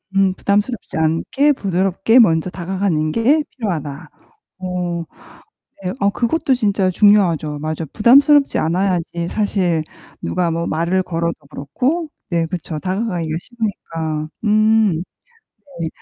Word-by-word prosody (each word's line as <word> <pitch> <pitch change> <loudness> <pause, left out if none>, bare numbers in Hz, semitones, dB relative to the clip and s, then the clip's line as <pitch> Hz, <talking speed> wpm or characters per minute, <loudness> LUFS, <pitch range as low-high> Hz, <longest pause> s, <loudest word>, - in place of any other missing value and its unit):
음 195 -1 +3
"부담스럽지 205 +3 -1
않게 165 - +2
부드럽게 195 +2 +2
먼저 165 -6 +4
다가가는 180 -3 -1
게 270 - +3
필요하다." 155 - -4 0.5
어 180 -2 -3 0.8
네. 180 - -2 0.2
그것도 275 +4 +1
진짜 205 -6 +1
중요하죠. 175 -7 +3
맞아. 155 +2 -3
부담스럽지 280 +6 +5
않아야지 170 0 -1
사실 185 -6 0 0.4
누가 175 -2 -1
뭐 165 +1 -2
말을 170 +4 0
걸어도 170 -1 -2 0.2
그렇고 260 - -2 0.2
네 170 -2 +1
그쵸 165 -1 -5
다가가기가 180 -4 -2
쉬우니까. 165 -9 -4 0.2
음 215 -4 +3 0.8
네. 165 - -1
185 Hz, 270 characters per minute, -19 LUFS, 165-215 Hz, 0.8 s, 부담스럽지